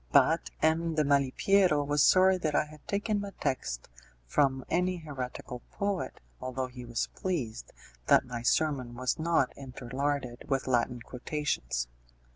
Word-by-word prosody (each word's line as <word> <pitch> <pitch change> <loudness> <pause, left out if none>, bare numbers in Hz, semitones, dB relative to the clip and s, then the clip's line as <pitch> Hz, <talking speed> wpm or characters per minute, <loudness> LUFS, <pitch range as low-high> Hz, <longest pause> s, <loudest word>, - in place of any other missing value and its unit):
But - - +4
M. 160 +1 +2
de 155 - +3
Malipiero 145 +4 +3
was 145 0 +2
sorry 185 +3 +6
that 155 -4 -1
I - - +3
had 150 0 -15
taken 205 +1 0
my 200 -1 -6
text - - -2 0.4
from 135 - +1
any 180 +2 +1
heretical 130 -5 -6
poet, 200 -2 -2 0.2
although 130 0 -3
he 125 -1 -9
was 120 0 -2
pleased 140 -12 -3 0.4
that - - +6
my 120 -2 -5
sermon 130 -1 +1
was 130 +4 -1
not 160 -5 +2
interlarded 130 0 -3
with 135 -1 +1
Latin 125 -1 +1
quotations. 120 - -2
140 Hz, 140 wpm, -30 LUFS, 125-160 Hz, 0.4 s, sorry